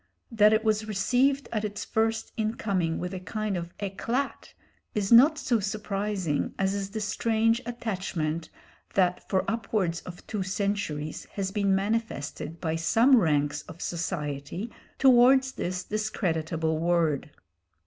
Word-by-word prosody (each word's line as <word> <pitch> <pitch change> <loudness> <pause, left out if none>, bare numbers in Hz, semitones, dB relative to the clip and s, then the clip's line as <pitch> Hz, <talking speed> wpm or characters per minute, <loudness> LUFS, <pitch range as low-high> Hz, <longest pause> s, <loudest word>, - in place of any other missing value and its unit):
That 215 -2 +5
it 220 0 +3
was 215 -1 +1
received 255 +7 +2
at 215 -2 -1
its 205 -1 -4
first 225 0 0
incoming 200 -6 -1
with 180 +1 -4
a 185 - -4
kind 210 +2 -3
of 170 -1 -6
éclat 230 +7 -3 0.4
is 205 -1 -1
not 280 +7 +8
so 245 -5 +1
surprising 200 -5 -2
as 190 0 +1
is 200 -1 -3
the 220 +2 -4
strange 225 +2 +1
attachment 185 -9 -3 0.5
that 180 -2 +1
for 190 - +1
upwards 205 -7 -1
of 180 -1 -10
two 210 -3 -3
centuries 185 -6 -2
has 195 -1 -2
been 200 -1 +2
manifested 195 -6 -2
by 160 -2 -1
some 230 +11 +5
ranks 150 -5 +1
of 165 - -10
society 170 +3 -4 0.3
towards 265 +1 +6
this 180 -5 -3
discreditable 165 -7 -1
word. 165 -4 +1
200 Hz, 135 wpm, -27 LUFS, 170-220 Hz, 0.5 s, not